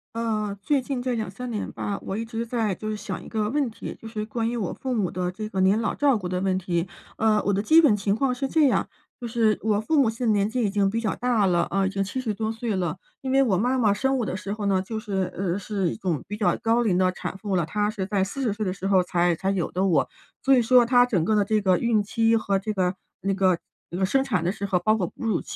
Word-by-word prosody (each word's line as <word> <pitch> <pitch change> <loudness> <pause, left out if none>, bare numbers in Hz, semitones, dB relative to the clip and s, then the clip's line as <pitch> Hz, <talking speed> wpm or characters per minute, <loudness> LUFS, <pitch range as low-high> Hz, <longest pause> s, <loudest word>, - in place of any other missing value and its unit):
呃， 215 -3 -2
最 285 +2 +2
近 255 -1 -3
这 255 - -2
2-3 230 +2 -4
年 210 - -3
吧， 200 - -3
我 195 - -4
一 225 - -2
直 230 0 -4
在 225 -4 -1
就 215 +4 -5
是 215 - -2
想 205 -3 -5
一 - - -11
个 215 -2 -1
问 280 0 0
题， 225 - -7
就 225 - -8
是 220 -1 -4
关 225 +1 -2
于 240 - -3
我 210 -7 -2
父 260 -1 -4
母 205 -7 0
的 180 0 -2
这 215 +4 -6
个 190 - -3
年 195 +4 +3
老 225 - 0
照 280 -4 +3
顾 185 -4 -5
的 180 0 -1
问 190 0 +1
题。 175 -1 -1 0.3
呃， 215 -1 +2
我 200 - +1
的 200 0 +1
基 315 +10 +6
本 255 -10 +4
情 200 0 0
况 255 +3 +1
是 270 +2 -2
这 305 +1 +4
样， - - +1 0.3
就 240 - -5
是 225 -2 +1
我 210 -1 +1
父 300 +7 +1
母 245 - +3
现 230 +2 -4
在 225 - +3
年 205 0 +2
纪 245 +1 -1
已 205 - +2
经 200 -1 +1
比 225 +3 -2
较 220 - 0
大 240 -4 +2
了， 175 -2 +2
啊， 195 0 +1
已 - - +1
经 195 0 -2
70 220 +3 -2
多 220 +1 -2
岁 225 -2 -2
了。 175 -3 -1 0.2
因 265 - -5
为 270 +1 +4
我 210 -8 +2
妈 250 +6 +1
妈 215 -5 +3
生 265 +5 0
我 235 - 0
的 190 - -3
时 200 +1 -4
候 210 -1 -4
呢， 190 -1 +2
就 220 +4 -5
是 195 -4 -2
呃， 185 -1 -1
是 200 -3 -1
一 - - -5
种 175 - -2
比 210 - -4
较 210 - +2
高 230 +1 +3
龄 200 -6 +2
的 185 0 +3
产 185 - -6
妇 195 -2 -2
了， 170 - +1
她 210 +6 0
是 200 -3 -4
在 200 -2 +1
40 225 +3 -2
岁 215 +1 -3
的 185 - 0
时 190 +1 -4
候 190 -2 +4
才 175 -1 +1
才 190 +4 -1
有 185 -4 -1
的 185 +2 0
我。 165 -7 +2 0.3
所 270 +1 +5
以 250 - +4
说 245 +1 +5
她 245 0 +5
整 190 -10 0
个 215 - +2
的 205 - +4
这 215 +2 +1
个 190 -3 +3
孕 230 -1 +2
期 225 +2 +2
和 200 -3 0
这 200 +3 -3
个 185 -2 0 0.2
那 195 0 -1
个 190 -2 +2 0.3
那 175 - -5
个 190 - +2
生 265 +8 +2
产 205 -11 -1
的 180 - +1
时 200 - -4
候， 190 -2 +1
包 215 +4 +2
括 190 -5 -1
哺 235 - -8
乳 210 -6 +1
210 Hz, 305 characters per minute, -25 LUFS, 190-230 Hz, 0.3 s, 基